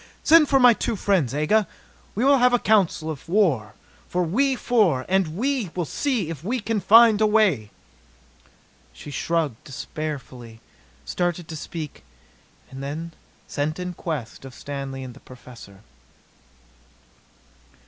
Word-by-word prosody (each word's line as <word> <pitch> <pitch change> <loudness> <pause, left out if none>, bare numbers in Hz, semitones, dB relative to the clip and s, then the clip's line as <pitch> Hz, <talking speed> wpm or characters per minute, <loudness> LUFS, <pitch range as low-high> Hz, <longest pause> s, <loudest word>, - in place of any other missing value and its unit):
Send 320 -2 +6
for 270 - +4
my 250 -2 +7
two 225 - -2
friends, 185 - +1
Aga. 155 +9 +1 0.5
We 230 +6 0
will 280 -1 +5
have 250 0 +4
a - - +5
council 195 -8 +1
of 150 +1 -10
war, 155 - +1 0.4
we 200 +11 +1
four, 205 - +1
and 190 -1 +2 0.6
see 250 - -1
if 160 -2 -7
we 245 +7 -1
can 225 0 -2
find 220 +2 +6
a 215 - +5
way!" 200 - +2 1.2
She 145 - -10
shrugged 155 -4 -2
despairfully, 135 -5 -7 0.5
started 175 - -2
to 160 - -6
speak, 155 0 -7 0.7
then 145 +5 -6 0.4
sent 150 +2 -2
in 180 0 -5
quest 150 -11 -6
of 135 -1 -11
Stanley 135 -2 -6
and 125 -1 -8
the - - -15
Professor. 120 -6 -14
165 Hz, 130 wpm, -23 LUFS, 140-215 Hz, 1.2 s, my